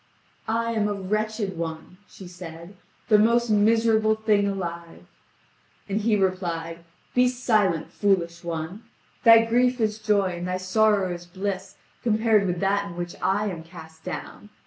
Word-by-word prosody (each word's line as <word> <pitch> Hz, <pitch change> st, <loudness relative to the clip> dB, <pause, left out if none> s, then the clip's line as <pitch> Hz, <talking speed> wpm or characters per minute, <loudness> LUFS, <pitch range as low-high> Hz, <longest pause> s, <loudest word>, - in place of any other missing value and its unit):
"I 230 Hz, +1 st, 0 dB
am 215 Hz, -2 st, 0 dB
a 205 Hz, -, -2 dB
wretched 210 Hz, -1 st, -2 dB
one," 165 Hz, +2 st, -6 dB
she 190 Hz, -, -12 dB
said, 175 Hz, +1 st, -10 dB, 0.3 s
"the 215 Hz, -3 st, +5 dB
most 235 Hz, +1 st, +3 dB
miserable 220 Hz, +1 st, +3 dB
thing 215 Hz, -2 st, +2 dB
alive." 170 Hz, -4 st, -5 dB, 0.8 s
And 205 Hz, +2 st, -1 dB
he 215 Hz, 0 st, +2 dB
replied: 175 Hz, -4 st, -2 dB, 0.3 s
"Be 250 Hz, 0 st, +4 dB
silent, 215 Hz, -9 st, +1 dB
foolish 175 Hz, -4 st, 0 dB
one! 170 Hz, +4 st, -5 dB, 0.4 s
Thy 230 Hz, -1 st, +8 dB
grief 245 Hz, +2 st, +2 dB
is 215 Hz, -1 st, 0 dB
joy 200 Hz, -4 st, +1 dB
and 175 Hz, -, -4 dB
thy 180 Hz, 0 st, -1 dB
sorrow 195 Hz, 0 st, +2 dB
is 175 Hz, 0 st, -9 dB
bliss 190 Hz, +2 st, -4 dB, 0.3 s
compared 220 Hz, -3 st, +2 dB
with 175 Hz, -1 st, -2 dB
that 200 Hz, +1 st, +1 dB
in 170 Hz, -, -9 dB
which 175 Hz, 0 st, -5 dB
I 200 Hz, +3 st, +1 dB
am 165 Hz, -3 st, -7 dB
cast 160 Hz, -1 st, -13 dB
down. 185 Hz, +3 st, -7 dB
200 Hz, 150 wpm, -25 LUFS, 175-220 Hz, 0.8 s, Thy